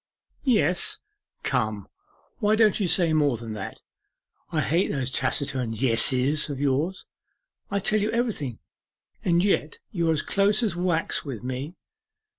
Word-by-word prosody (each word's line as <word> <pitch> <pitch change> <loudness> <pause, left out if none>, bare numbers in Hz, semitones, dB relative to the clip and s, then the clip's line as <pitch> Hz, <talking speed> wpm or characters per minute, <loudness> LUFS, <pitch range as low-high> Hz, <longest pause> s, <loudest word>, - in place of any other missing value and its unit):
'"Yes." 195 - +2 0.5
Come, 110 -6 -1 0.5
why 210 +1 +2
don't 220 -2 +3
you 195 - +1
say 170 -2 +3
more 145 -5 +2
than 115 -1 -7
that? 105 -3 -7 0.7
I 155 - 0
hate 165 +7 +1
those 135 -2 -2
taciturn 130 -2 0
"Yesses" 130 +5 +3
of 140 -2 -5
yours. 145 +7 -1 0.6
I 200 - -1
tell 215 +2 +3
you 210 - 0
everything, 220 - -2 0.7
and 175 +1 +2
yet 155 -6 0
you 170 -4 0
are - - +4
as 155 - -1
close 205 +3 +2
as 205 -6 0
wax 175 +1 0
with 130 -7 -7
me. 130 +7 -5
155 Hz, 145 wpm, -25 LUFS, 130-195 Hz, 0.7 s, are